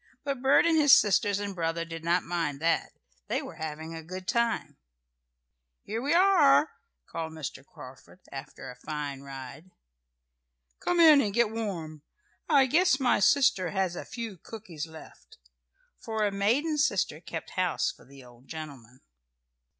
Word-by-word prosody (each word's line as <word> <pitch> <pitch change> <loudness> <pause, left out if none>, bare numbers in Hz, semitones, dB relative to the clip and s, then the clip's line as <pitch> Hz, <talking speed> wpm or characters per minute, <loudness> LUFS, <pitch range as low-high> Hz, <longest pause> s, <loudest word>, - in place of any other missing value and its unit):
But 275 -3 -3
Bert 270 +4 +5
and 335 -1 +3
his 290 -2 +8
sisters 205 -1 +2
and 205 -1 -4
brother 165 -1 -2
did 165 -1 -8
not 170 +1 +1
mind 165 -5 -2
that. 165 +2 0 0.3
They - - 0
were - - -10
having 160 +1 -6
a 165 - -7
good 185 +3 -8
time. 235 +1 -1 1.1
"Here 220 +3 -4
we 280 +3 -1
are!" 340 -6 +5 0.3
called 160 -1 -6
Mr. 140 -4 -7
Carford 135 +5 -14
after 135 -2 -8
a - - -13
fine 145 0 -5
ride. 135 +4 -10 1.1
"Come 355 -1 0
in 310 -4 +8
and 205 -4 -2
get 235 -2 +3
warm. 175 -9 -5 0.5
I 280 -4 +5
guess 300 +1 +3
my 255 -2 +2
sister 200 -6 +3
has 190 -2 -1
a - - -5
few 225 -6 -7
cookies 175 -7 -8
left," 160 0 -14 0.6
for 220 -1 -3
a 205 - 0
maiden 255 +11 +1
sister 195 - +1
kept 160 -2 -7
house 180 -3 0
for - - -19
the 135 0 -15
old 125 +1 -18
gentleman. 135 -6 -9
185 Hz, 155 wpm, -28 LUFS, 155-235 Hz, 1.1 s, his